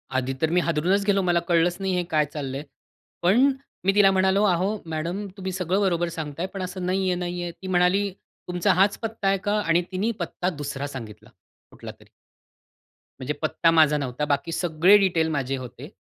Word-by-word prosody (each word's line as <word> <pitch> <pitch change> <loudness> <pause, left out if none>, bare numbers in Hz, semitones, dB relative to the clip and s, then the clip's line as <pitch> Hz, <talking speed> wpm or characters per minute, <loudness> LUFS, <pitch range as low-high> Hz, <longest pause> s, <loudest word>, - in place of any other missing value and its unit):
आधी 130 0 0
तर 160 - +2
मी - - +5
हादरूनच 175 +5 +1
गेलो. 200 -1 +3
मला 175 -2 +2
कळलंच 175 +1 +2
नाही 190 -1 -1
हे 180 - 0
काय 155 -1 +3
चाललंय. 140 -1 -4 0.6
पण 235 +11 +4 0.3
मी 195 - +4
तिला 200 -2 +6
म्हणालो, 190 +2 +2
"अहो 190 +3 +1 0.2
मॅडम 175 +6 -3
तुम्ही 190 0 -4
सगळं 185 +2 -1
बरोबर 175 -3 +1
सांगताय 155 +2 -4
पण 195 - -5
असं 185 0 -5
नाहीये-नाहीये." 180 -2 -1
ती 190 +2 -11
म्हणाली, 185 +2 +2 0.4
"तुमचा 180 -1 +1
हाच 195 +2 +3
पत्ता 225 -3 -3
आहे 195 0 +3
का?" 210 +1 +2
आणि 165 0 +2
तिने 205 +5 0
पत्ता 175 +1 -2
दुसरा 145 -3 -5
सांगितला 115 -6 -9 0.4
कुठलातरी. - - -12 1.1
म्हणजे 130 +3 -3
पत्ता 165 +1 +2
माझा 155 -2 +4
नव्हता. 135 +1 -3
बाकी 145 +3 -1
सगळे 175 +4 +4
डिटेल 175 -5 +2
माझे 135 -3 -2
होते. 125 -2 -9
175 Hz, 170 wpm, -24 LUFS, 155-190 Hz, 1.1 s, तिला